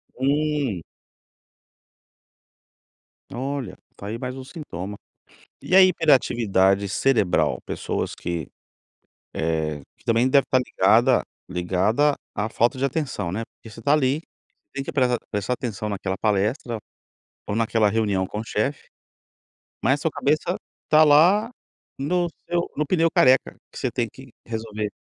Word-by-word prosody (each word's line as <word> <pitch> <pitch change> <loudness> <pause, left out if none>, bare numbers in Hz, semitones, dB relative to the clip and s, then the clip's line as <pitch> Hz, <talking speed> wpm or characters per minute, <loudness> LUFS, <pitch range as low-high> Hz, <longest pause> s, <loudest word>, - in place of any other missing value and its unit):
Hum. 140 - 0 2.5
Olha, 135 -3 -4 0.2
tá 100 - -8
aí 110 +3 -4
mais 125 +1 -5
um 130 - -7
sintoma. 105 - -7 0.7
E 185 - 0
a 190 - +10
hiperatividade 115 - +3
cerebral? 105 -2 +1
Pessoas - - -3
que, 85 -4 -4 0.8
eh, 80 -2 -1 0.2
que - - -28
também 115 +3 +3
deve 140 +1 +5
estar 130 - +2
ligada 120 +2 +3 0.3
ligada 95 +11 +1 0.2
à 105 +2 -1
falta 120 +4 +1
de 130 - -3
atenção, 135 - -2
né. 110 +4 -3
Porque 115 - -14
você 115 - -11
tá 145 +4 +3
ali, 145 0 +2 0.5
tem 140 0 -3
que - - -5
prea 125 -3 +2
prestar 105 +3 -1
atenção 110 -4 -4
naquela 95 -1 -3
palestra, 110 +4 0 0.7
ou 100 - -1
naquela 115 -2 +2
reunião 100 -3 0
com 105 - -5
o - - -6
chefe, 115 +6 -2 0.9
mas 130 - +4
a - - -8
sua 160 - +1
cabeça 155 +5 0 0.4
tá 155 0 +7
lá 175 +10 +5 0.5
no 175 +6 0 0.2
seu 175 0 -1
no 150 - 0
pneu 165 +1 +3
careca 130 -3 +4 0.2
que - - -9
você 130 - -1
tem 120 -1 -1
que 135 -1 -13 0.2
resolver. 110 -2 -4
120 Hz, 140 wpm, -24 LUFS, 105-145 Hz, 2.5 s, a